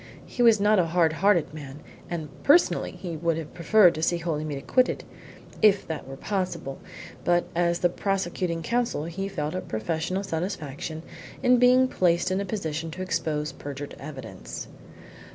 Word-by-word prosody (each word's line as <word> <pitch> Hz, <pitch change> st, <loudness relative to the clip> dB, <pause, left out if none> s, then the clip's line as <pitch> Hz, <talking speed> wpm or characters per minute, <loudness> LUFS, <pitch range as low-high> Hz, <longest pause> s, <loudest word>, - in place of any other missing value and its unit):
He 245 Hz, -, -4 dB
was 230 Hz, -3 st, +6 dB
not 210 Hz, 0 st, +4 dB
a 170 Hz, -, +2 dB
hard 165 Hz, -1 st, +3 dB
hearted 180 Hz, -3 st, +2 dB
man, 145 Hz, -2 st, -8 dB, 0.3 s
and 165 Hz, -3 st, -3 dB
personally 320 Hz, +5 st, +4 dB
he 175 Hz, -3 st, -6 dB
would 165 Hz, 0 st, 0 dB
have 160 Hz, -2 st, -6 dB
preferred 180 Hz, +1 st, +5 dB
to 155 Hz, -, -5 dB
see 175 Hz, +1 st, +2 dB
Holymead 155 Hz, -3 st, -3 dB
acquitted, 255 Hz, -, +1 dB, 0.6 s
if 205 Hz, -2 st, +5 dB
that 160 Hz, -4 st, -5 dB
were 135 Hz, 0 st, -8 dB
possible, 185 Hz, -7 st, -3 dB, 0.4 s
but 175 Hz, +2 st, +3 dB
as 170 Hz, 0 st, +2 dB
the 175 Hz, -, +4 dB
prosecuting 180 Hz, -3 st, -2 dB
Counsel 235 Hz, -5 st, 0 dB
he 185 Hz, +4 st, -4 dB
felt 155 Hz, -6 st, -3 dB
a 185 Hz, -, -2 dB
professional 160 Hz, -, -2 dB
satisfaction 160 Hz, -4 st, -4 dB, 0.4 s
in 250 Hz, -1 st, +5 dB
being 250 Hz, +1 st, +6 dB
placed 180 Hz, -5 st, +2 dB
in 190 Hz, -, +1 dB
the 200 Hz, -, -2 dB
position 165 Hz, -5 st, -3 dB
to 185 Hz, +4 st, -5 dB
expose 160 Hz, -4 st, -1 dB
perjured 145 Hz, 0 st, -7 dB
evidence. 130 Hz, -10 st, -8 dB
170 Hz, 160 wpm, -26 LUFS, 155-195 Hz, 0.6 s, was